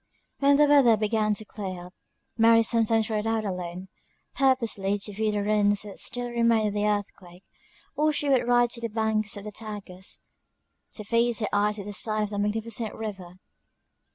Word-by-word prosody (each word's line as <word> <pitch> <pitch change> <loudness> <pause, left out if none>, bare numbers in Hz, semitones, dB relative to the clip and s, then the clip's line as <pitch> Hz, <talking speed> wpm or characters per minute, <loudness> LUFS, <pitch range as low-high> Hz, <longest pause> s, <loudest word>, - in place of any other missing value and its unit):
When 280 0 +4
the 295 - +6
weather 275 -6 +5
began 215 0 0
to 215 - -5
clear 185 -4 -7
up, 180 - -14 0.4
Mary 230 0 +5
sometimes 225 -1 +1
rode 215 -1 -2
out 225 -1 -1
alone, 180 -1 -5 0.5
purposely 230 -7 +1
to 205 +1 -6
view 215 +1 0
the 205 -1 -1
ruins 205 -1 +2
that 205 -2 -9
still 245 0 -1
remained 230 -2 +2
of - - -6
the 210 0 0
earthquake: 195 -3 -4 0.5
or 305 +1 +2
she 295 -1 -1
would 260 -3 +2
ride 240 -1 +3
to 235 - -4
the 230 - -3
banks 215 -1 -1
of 200 - -8
the 210 - -7
Tagus, 205 -3 -5 0.7
to 215 - -6
feast 235 +2 +1
her 215 - 0
eyes 210 +1 +1
with 200 - -7
the 205 - -6
sight 215 +1 +1
of 210 - -3
that 205 - -3
magnificent 220 +2 -2
river. 190 -5 -7
215 Hz, 185 wpm, -26 LUFS, 205-230 Hz, 0.7 s, the